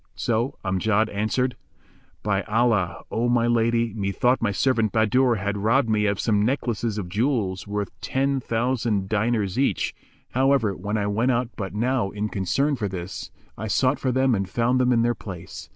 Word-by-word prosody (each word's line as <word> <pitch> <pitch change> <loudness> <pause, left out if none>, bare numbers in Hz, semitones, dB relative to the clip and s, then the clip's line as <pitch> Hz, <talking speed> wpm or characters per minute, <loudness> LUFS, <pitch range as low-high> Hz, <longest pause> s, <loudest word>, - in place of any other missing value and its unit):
So 120 +4 -1
Amjad 100 +4 +1
answered, 125 +5 0 0.7
"By 100 -2 +1
Allah, 110 -5 +1
O 120 +2 0
my 120 -1 +3
lady, 115 -1 +2
methought 110 +5 +1
my 110 -3 +1
servant 115 0 +1
Bahadur 120 +3 +3
had 100 0 -2
robbed 115 +3 +2
me 105 -1 +2
of 100 -2 0
some 105 -3 +2
necklaces 115 -3 -1
of 100 -4 -3
jewels, 105 -2 -1
worth 100 -1 -3
ten 135 +1 0
thousand 115 -5 -1
diners 110 0 0
each; 140 - +1 0.4
however, 130 -6 +2
when 105 +3 -3
I 100 - 0
went 110 +5 +1
out 125 -1 +1
but 95 -2 -5
now 120 -1 0
in 105 +1 -3
concern 135 +11 0
for 105 -5 -2
this, 90 0 -6 0.3
I 110 - -3
sought 130 +5 +2
for 130 - 0
them 130 0 +2
and 95 -3 -1
found 120 +4 +1
them 125 0 +3
in 115 -2 +3
their 120 0 +2
place. 85 -5 -9
110 Hz, 175 wpm, -24 LUFS, 100-125 Hz, 0.7 s, my